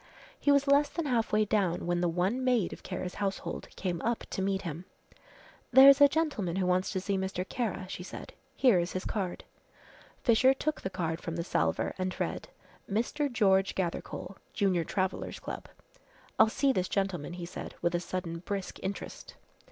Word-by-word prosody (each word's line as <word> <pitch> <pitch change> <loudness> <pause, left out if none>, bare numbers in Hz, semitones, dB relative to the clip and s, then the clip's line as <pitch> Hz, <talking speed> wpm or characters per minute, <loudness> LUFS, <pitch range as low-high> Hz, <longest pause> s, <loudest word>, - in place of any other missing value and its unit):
He 285 - +3
was 280 0 +4
less 285 +1 +4
than 335 - -3
half 240 -5 +1
way 215 0 +3
down 190 -5 0
when 175 0 0
the 175 - +2
one 185 +9 0
maid 245 -7 +2
of - - -11
Kara's 185 -1 -5
household 195 -1 -3
came 175 -3 -2
up 235 0 -1
to - - -2
meet 195 0 0
him. 170 +1 -5 0.9
"There's 275 +2 +9
a 285 - +10
gentleman 275 - -1
who 190 -1 +1
wants 180 +1 +2
to 190 - 0
see 195 +1 -1
Mr. 190 -1 -3
Kara," 220 -6 -2
she 185 - -6
said, 180 - -8 0.2
"here 245 -9 +5
is 175 +1 -2
his 185 - -3
card." 190 -4 -3 0.8
Fisher 255 +3 +5
took 310 +2 -2
the 190 - -3
card 170 -3 -3
from 165 - -4
the 170 - -2
salver - - 0
and 185 0 -2
read, - - -3 0.4
"Mr. 245 +7 0
George 195 -4 +3
Gathercole, 185 +1 -4 0.2
Junior 190 -4 +2
Travellers' 185 +2 -2
Club." - - -7 0.7
"I'll 220 - +7
see 275 +4 +2
this 185 -5 -1
gentleman," 190 -6 -1
he 175 -1 -6
said, 175 - -7
with 170 - +2
a 175 - +1
sudden 170 -1 -4
brisk 195 +2 -5
interest. 195 +1 -6
190 Hz, 185 wpm, -30 LUFS, 180-235 Hz, 0.9 s, a